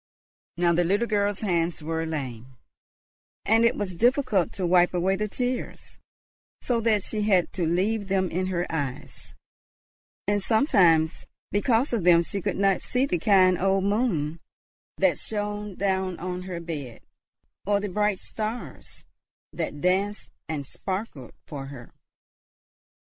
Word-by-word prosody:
Now 170 Hz, 0 st, +3 dB
the 175 Hz, +1 st, +3 dB
little 200 Hz, +7 st, +1 dB
girl's 205 Hz, -2 st, 0 dB
hands 170 Hz, -5 st, 0 dB
were 160 Hz, +1 st, -2 dB
lame, 130 Hz, -5 st, -6 dB, 0.9 s
and 225 Hz, +2 st, +4 dB
it 235 Hz, +1 st, +4 dB
was 195 Hz, -3 st, -3 dB
difficult 240 Hz, -, +2 dB
to 190 Hz, -, -3 dB
wipe 175 Hz, 0 st, +4 dB
away 185 Hz, +2 st, +2 dB
the 210 Hz, +2 st, -2 dB
tears; 250 Hz, +4 st, -4 dB, 0.6 s
so 235 Hz, -2 st, 0 dB
that 215 Hz, -3 st, +2 dB
she 215 Hz, 0 st, -3 dB
had 190 Hz, -5 st, +2 dB
to 175 Hz, -4 st, -1 dB
leave 200 Hz, +5 st, 0 dB
them 190 Hz, -1 st, 0 dB
in 185 Hz, +2 st, -1 dB
her 180 Hz, -2 st, -1 dB
eyes, 140 Hz, -5 st, -5 dB, 0.9 s
and 205 Hz, 0 st, +1 dB
sometimes 180 Hz, -, +3 dB, 0.2 s
because 230 Hz, +6 st, +1 dB
of 220 Hz, -6 st, 0 dB
them 170 Hz, -1 st, +6 dB
she 195 Hz, +3 st, -4 dB
could -, -, -2 dB
not 195 Hz, -1 st, +2 dB
see 250 Hz, +2 st, 0 dB
the 180 Hz, -11 st, -1 dB
kind 185 Hz, -1 st, +4 dB
old 195 Hz, 0 st, +2 dB
moon 195 Hz, -8 st, 0 dB, 0.6 s
that -, -, +2 dB
shone 210 Hz, -1 st, -4 dB
down 190 Hz, -2 st, -1 dB
on 180 Hz, +1 st, -4 dB
her 175 Hz, -2 st, -4 dB
bed, 145 Hz, -8 st, -6 dB, 0.7 s
or 205 Hz, 0 st, +3 dB
the 205 Hz, -, -3 dB
bright 210 Hz, +1 st, +1 dB
stars 220 Hz, +5 st, -6 dB, 0.5 s
that 145 Hz, -, -4 dB
danced 195 Hz, +3 st, 0 dB, 0.2 s
and 150 Hz, -3 st, -3 dB
sparkled 185 Hz, -, -5 dB
for 140 Hz, -2 st, -7 dB
her. 130 Hz, -4 st, -11 dB
190 Hz, 140 wpm, -26 LUFS, 170-210 Hz, 0.9 s, them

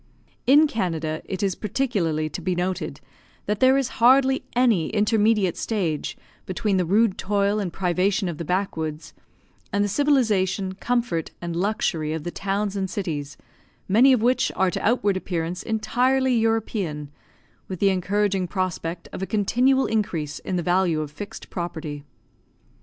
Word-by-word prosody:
In 290 Hz, +4 st, +7 dB
Canada, 165 Hz, -, -2 dB
it 190 Hz, +1 st, -4 dB
is 195 Hz, -2 st, +1 dB
particularly 185 Hz, -, -1 dB
to -, -, -6 dB
be 185 Hz, -1 st, -1 dB
noted, 180 Hz, +1 st, -3 dB, 0.4 s
that 210 Hz, 0 st, -1 dB
there 260 Hz, +1 st, +5 dB
is 270 Hz, -3 st, 0 dB
hardly 265 Hz, +2 st, +5 dB
any 235 Hz, -9 st, +3 dB
intermediate 210 Hz, -3 st, +2 dB
stage 175 Hz, -10 st, -2 dB, 0.3 s
between 190 Hz, +1 st, 0 dB
the 180 Hz, -, +1 dB
rude 205 Hz, +3 st, +2 dB
toil 200 Hz, +1 st, +1 dB
and 190 Hz, -4 st, -2 dB
privation 185 Hz, +2 st, 0 dB
of 170 Hz, -3 st, -5 dB
the -, -, -3 dB
back 185 Hz, +4 st, -1 dB
woods, 155 Hz, -1 st, -5 dB, 0.6 s
and 200 Hz, +1 st, +1 dB
the -, -, +1 dB
civilisation, 205 Hz, -7 st, +1 dB
comfort, 235 Hz, -5 st, -1 dB
and 170 Hz, -1 st, -4 dB
luxury 170 Hz, -5 st, -1 dB
of 160 Hz, -2 st, -4 dB
the 175 Hz, -, -4 dB
towns 200 Hz, +2 st, -2 dB
and 190 Hz, -1 st, -2 dB
cities, 150 Hz, -8 st, -4 dB, 0.5 s
many 235 Hz, +8 st, +6 dB
of 245 Hz, -4 st, +3 dB
which 250 Hz, +2 st, +2 dB
are 190 Hz, -1 st, +2 dB
to -, -, -4 dB
outward 210 Hz, -4 st, +2 dB
appearance 175 Hz, -1 st, -3 dB
entirely 250 Hz, +3 st, +1 dB
European, 210 Hz, -10 st, -1 dB, 0.6 s
with 185 Hz, -, -5 dB
the 200 Hz, -, +4 dB
encouraging 195 Hz, 0 st, 0 dB
prospect 175 Hz, -2 st, -3 dB
of -, -, -6 dB
a 190 Hz, -, -2 dB
continual 250 Hz, +6 st, +2 dB
increase 170 Hz, -9 st, -2 dB
in 185 Hz, -, -4 dB
the 175 Hz, -, -1 dB
value 175 Hz, -3 st, +2 dB
of 150 Hz, -1 st, -5 dB
fixed 200 Hz, +7 st, -9 dB
property. 160 Hz, -5 st, -5 dB
195 Hz, 155 wpm, -24 LUFS, 175-220 Hz, 0.6 s, In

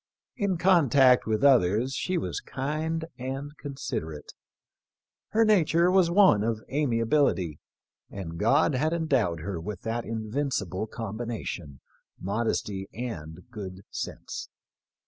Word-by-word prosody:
In 200 Hz, -6 st, 0 dB
contact 140 Hz, -9 st, +5 dB
with 110 Hz, +3 st, 0 dB
others 125 Hz, -1 st, +4 dB
she 185 Hz, +5 st, -1 dB
was -, -, -2 dB
kind 155 Hz, +4 st, -3 dB
and 135 Hz, +3 st, -5 dB
considerate. 80 Hz, -, -5 dB, 1.0 s
Her 225 Hz, +1 st, +3 dB
nature 175 Hz, -4 st, +4 dB
was 185 Hz, -2 st, +4 dB
one 175 Hz, -, +5 dB
of 110 Hz, -1 st, -1 dB
amiability, 115 Hz, -, +1 dB, 0.5 s
and 85 Hz, -4 st, -7 dB
God 140 Hz, +8 st, +3 dB
had 155 Hz, +5 st, +1 dB
endowed 130 Hz, -, +1 dB
her 90 Hz, -1 st, -4 dB
with 100 Hz, +1 st, -6 dB
that 115 Hz, +1 st, -2 dB
invincible 110 Hz, -, -2 dB
combination 110 Hz, -, -5 dB, 0.2 s
— -, -, -44 dB
modesty 100 Hz, -1 st, -2 dB
and 90 Hz, -9 st, -6 dB
good 95 Hz, -3 st, -7 dB
sense. -, -, -6 dB
120 Hz, 115 wpm, -27 LUFS, 100-150 Hz, 1.0 s, contact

